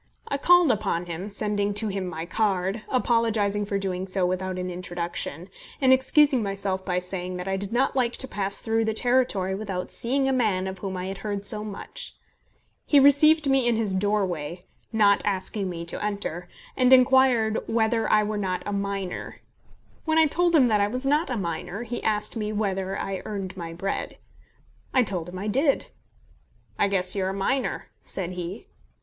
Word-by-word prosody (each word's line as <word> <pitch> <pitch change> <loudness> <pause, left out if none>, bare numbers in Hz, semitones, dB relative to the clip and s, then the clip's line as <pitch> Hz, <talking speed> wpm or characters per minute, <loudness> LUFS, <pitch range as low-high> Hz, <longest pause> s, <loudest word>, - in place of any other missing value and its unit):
I 280 - -2
called 350 -2 +5
upon 200 -6 -1
him, 175 +4 -5
sending 205 0 -1
to 215 +1 +1
him 195 -1 -3
my 165 -2 -5
card, 195 +1 0
apologising 225 -5 +1
for 200 0 -1
doing 190 -1 -3
so 185 -1 0
without 185 +1 -2
an 180 0 -3
introduction, 175 -2 -4 0.3
and 260 -1 +5
excusing 265 0 +4
myself 195 -2 -2
by 180 -2 -1
saying 180 0 -4
that 180 +1 -6
I 195 - 0
did 195 +1 -5
not 260 +4 +1
like 245 -2 +1
to 265 - -2
pass 200 -3 +1
through 225 0 0
the 220 0 -1
territory 245 -7 +1
without 190 -2 -4
seeing 270 +3 +2
a 270 - +2
man 210 -7 +1
of 190 0 -5
whom 190 -2 -4
I 180 - -4
had 195 +1 -5
heard 205 -1 -4
so 210 0 +4
much. 210 -2 -7 0.7
He 290 - +4
received 290 +2 +5
me 270 -2 +3
in 235 - +3
his 220 -3 0
doorway, 185 -4 -1 0.3
not 205 -3 +4
asking 195 0 -2
me 170 -1 -5
to 170 - -4
enter, 200 -4 -3 0.3
and 255 -1 +3
inquired 255 -4 +5
whether 225 0 +1
I 215 0 +4
were 210 0 -2
not 185 -2 -2
a 205 - -3
miner. 200 -2 -3 0.7
When 320 -1 +1
I 320 - +6
told 345 +3 +2
him 270 -5 +6
that 210 -3 +2
I 200 - +3
was 250 +5 -2
not 295 +3 +2
a 250 - -2
miner, 175 +3 -4
he 240 0 -5
asked 210 +1 -1
me 215 -2 -2
whether 195 -2 -2
I 195 -1 -4
earned 195 -3 -5
my 170 -3 -6
bread. 195 +4 -4 0.8
I 255 - +5
told 180 -6 -3
him 180 - -8
I 195 - -5
did. 275 +6 +1 0.9
"I 200 - +4
guess 185 -1 +3
you're 190 -1 0
a - - -3
miner," 255 +7 -1
said 185 -2 -3
he. 180 0 -6
205 Hz, 190 wpm, -25 LUFS, 185-235 Hz, 0.9 s, I